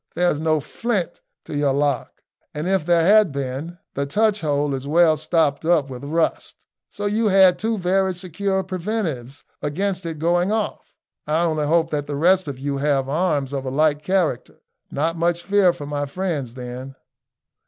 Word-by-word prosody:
"There's 175 -4 +1
no 155 0 +1
flint 195 - -3 0.2
to - - -6
your 145 -2 +2
lock, 140 -2 -1 0.3
and 150 +3 -3
if 190 -4 0
there 170 -1 +4
had 210 -2 +5
been, 140 +5 -4 0.2
the 140 0 -2
touch 210 +5 +1
hole 145 -2 0
is 135 +1 -4
well 160 +1 +4
stopped 155 -1 0
up 160 -5 +2
with 125 +1 -8
rust, 160 +3 -2 0.2
so 205 - -6
you 215 +2 +1
had 190 -2 +5
two 225 +1 -1
very 190 0 +1
secure 190 +2 -2
preventives 175 - -4 0.2
against 185 +5 -2
its 165 -1 -5
going 175 +4 +1
off. 220 -1 -3 0.3
I 155 +3 +1
only 155 -3 0
hope 165 +1 +2
that 145 -1 -2
the 145 - -3
rest 180 +4 +3
of 140 -3 -5
you 140 +1 -3
have 140 -1 +1
arms 145 -3 0
of 135 -1 -2
a 130 - -3
like 150 +2 +2
character. 180 -8 -1 0.3
Not 165 +4 -1
much 170 +1 0
fear 195 -1 +4
for 170 -4 -8
my 145 0 -3
friends 145 -7 -3
then." 125 +1 -7
160 Hz, 175 wpm, -22 LUFS, 145-185 Hz, 0.3 s, had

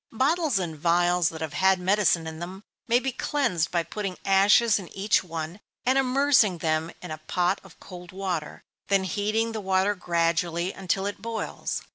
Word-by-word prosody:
_ - - -13
Bottles 300 - +2
and 170 -4 -3
vials 175 +2 +2
that 160 -1 -9
have 160 -2 -4
had 190 0 +3
medicine 185 -3 +2
in 160 0 -7
them, 185 +4 -7 0.2
may 235 0 +4
be 265 +1 -1
cleansed 235 - 0
by 170 -1 0
putting 195 0 -5
ashes 200 +3 +5
in 185 - -9
each 200 0 +2
one, 165 +1 -6 0.3
and 260 +1 +3
immersing 265 -7 +3
them 160 0 -1
in 180 - -7
a 155 - -5
pot 180 +2 0
of 190 -3 -17
cold 180 -2 -11
water, 185 -5 -4 0.2
then 195 -1 +2
heating 210 +5 -1
the 220 -1 -4
water 190 +1 +2
gradually, 170 0 0
until 190 0 -2
it 200 -1 -4
boils. 225 0 -4
190 Hz, 180 wpm, -26 LUFS, 170-210 Hz, 0.3 s, ashes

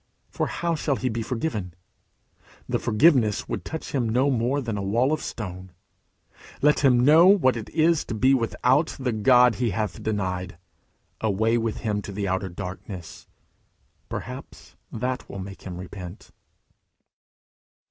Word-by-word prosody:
For - - -1
how 170 0 -2
shall 150 -3 0
he 130 0 -2
be 115 0 -3
forgiven? 110 - -3 0.9
The - - 0
forgiveness 115 -3 +3
would - - -4
touch 160 - -6
him 125 -5 0
no 130 +5 +2
more 125 +3 +1
than 115 -5 -3
a 100 - -3
wall 120 +9 +1
of 155 - -2
stone. 95 -3 -7 0.9
Let 150 +1 +4
him 125 -3 +4
know 160 +5 +7
what 175 -11 +5
it 115 - -6
is 165 0 +2
to - - -4
be 130 +5 +4
without 130 +4 +1
the 130 -2 -1
God 120 +1 +5
he 120 - +2
hath 105 +1 -3
denied. 95 -5 -3 0.6
Away 110 +2 +1
with 115 -1 -3
him 105 -2 -1
to 100 - -8
the 100 0 -3
Outer 95 +1 -1
Darkness! 90 -2 -8 0.8
Perhaps - - -8 0.2
that 125 +2 -3
will - - -7
make 95 0 -8
him 90 -2 -7
repent. 90 +1 -9
115 Hz, 150 wpm, -25 LUFS, 100-130 Hz, 0.9 s, know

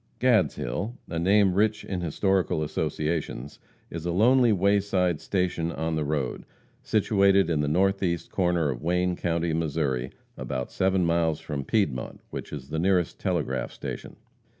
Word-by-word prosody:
Gadshill, 110 - +1
a 85 - -3
name 95 +2 +4
rich 105 +2 +1
in 95 -2 -3
historical 85 -1 +1
associations, 75 -3 -3 0.3
is 85 -1 -5
a 85 - -1
lonely 120 +6 +4
wayside 100 -4 +2
station 90 -3 -1
on 80 0 -2
the 80 - 0
road, 70 -3 -2 0.4
situated 100 -4 +3
in 80 - +1
the 75 - 0
northeast 95 +1 +1
corner 85 -5 +1
of - - -6
Wayne 90 +2 +1
county, 85 -1 -1
Missouri, 75 -6 -1 0.3
about 65 -1 -4
seven 95 -1 +1
miles 85 -2 +1
from 75 -3 -4
Piedmont, 75 - -1
which - - -6
is 70 -3 -7
the 80 +1 -2
nearest 90 -1 +1
telegraph 80 -9 -1
station. - - -7
85 Hz, 145 wpm, -26 LUFS, 75-95 Hz, 0.4 s, name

